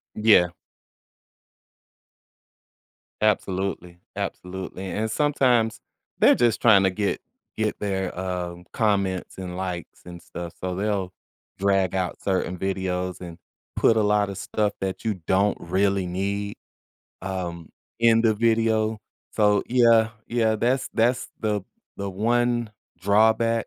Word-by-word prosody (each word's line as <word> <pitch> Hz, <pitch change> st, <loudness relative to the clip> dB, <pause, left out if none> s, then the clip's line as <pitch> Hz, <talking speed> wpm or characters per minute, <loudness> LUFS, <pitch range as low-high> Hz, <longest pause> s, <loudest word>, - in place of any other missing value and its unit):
Yeah. 105 Hz, -5 st, +5 dB, 2.7 s
Absolutely. 95 Hz, -4 st, -1 dB, 0.2 s
Absolutely, 95 Hz, +1 st, -5 dB
and 110 Hz, +3 st, -2 dB
sometimes 125 Hz, -4 st, +2 dB, 0.4 s
they're -, -, +6 dB
just 120 Hz, -2 st, +2 dB
trying 100 Hz, -5 st, +6 dB
to 95 Hz, -, +4 dB
get 100 Hz, +2 st, -2 dB, 0.4 s
get 110 Hz, -1 st, -1 dB
their, 95 Hz, -3 st, -2 dB
uh, 90 Hz, -2 st, -3 dB, 0.2 s
comments 100 Hz, -6 st, 0 dB
and 90 Hz, -1 st, -6 dB
likes 90 Hz, -2 st, -5 dB
and 85 Hz, -1 st, -10 dB
stuff, 85 Hz, -1 st, -8 dB
so 90 Hz, 0 st, -3 dB
they'll 100 Hz, -2 st, -1 dB, 0.5 s
drag 95 Hz, -2 st, +2 dB
out 90 Hz, -2 st, -2 dB
certain 95 Hz, -1 st, -1 dB
videos 90 Hz, -1 st, -2 dB
and 85 Hz, -1 st, -8 dB, 0.4 s
put 115 Hz, -, +4 dB
a -, -, +4 dB
lot 105 Hz, -1 st, +2 dB
of 95 Hz, -, -6 dB
stuff 105 Hz, +1 st, -1 dB
that 95 Hz, +2 st, -4 dB
you 110 Hz, -2 st, 0 dB
don't 100 Hz, +2 st, +2 dB
really 95 Hz, +2 st, +1 dB
need, 100 Hz, +3 st, -2 dB, 0.7 s
um, 90 Hz, -3 st, -5 dB, 0.3 s
in 115 Hz, -1 st, +5 dB
the 115 Hz, -2 st, +4 dB
video. 110 Hz, -1 st, +1 dB, 0.3 s
So, 105 Hz, -2 st, +3 dB
yeah, 115 Hz, -2 st, +5 dB, 0.2 s
yeah, 115 Hz, -2 st, +1 dB
that's 125 Hz, +4 st, 0 dB
that's 120 Hz, +2 st, +1 dB
the 105 Hz, -2 st, 0 dB, 0.4 s
the 100 Hz, 0 st, -4 dB
one 120 Hz, +3 st, +1 dB, 0.3 s
drawback 110 Hz, +4 st, +3 dB
100 Hz, 120 wpm, -24 LUFS, 95-110 Hz, 2.7 s, they're